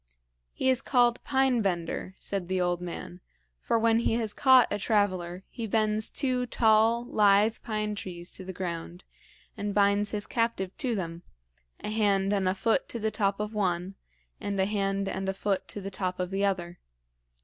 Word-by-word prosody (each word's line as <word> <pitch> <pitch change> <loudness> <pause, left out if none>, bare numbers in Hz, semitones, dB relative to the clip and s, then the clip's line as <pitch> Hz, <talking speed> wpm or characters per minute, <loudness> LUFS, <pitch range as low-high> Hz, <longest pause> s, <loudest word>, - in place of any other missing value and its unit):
"He - - -2
is 260 0 +3
called 245 -2 +2
Pine 265 -3 +2
bender," 185 -1 -2
said 195 -3 -3
the 185 0 0
old 175 -1 0
man; 180 0 -7 0.4
"for 230 - +1
when 225 0 +3
he 230 - +1
has 225 -3 -1
caught 260 -1 +6
a 205 - -1
traveler, 185 -4 0
he 230 -2 -5
bends 215 0 +1
two 255 -3 0
tall, 225 +1 +3
lithe 210 -1 +4
pine 215 -2 -2
trees 175 -3 -6
to 190 - -6
the 190 - -6
ground 175 -1 -5 0.5
and 205 -1 -3
binds 205 0 +3
his 210 0 -3
captive 230 -6 -1
to 245 -3 0
them 170 -3 -4 0.6
a 210 - -4
hand 200 -2 +2
and 195 -2 +1
a 185 - 0
foot 225 +6 +1
to - - -4
the 220 0 -1
top 200 -2 0
of 210 +1 -3
one, 185 -2 -1 0.5
and 200 -1 -3
a 190 - +3
hand 195 -1 -1
and 195 0 -2
a 195 - -2
foot 195 -1 -1
to - - -7
the 195 0 -6
top 185 -1 -3
of 180 0 -2
the 195 +1 -1
other. 175 -3 -1
205 Hz, 185 wpm, -28 LUFS, 185-225 Hz, 0.6 s, caught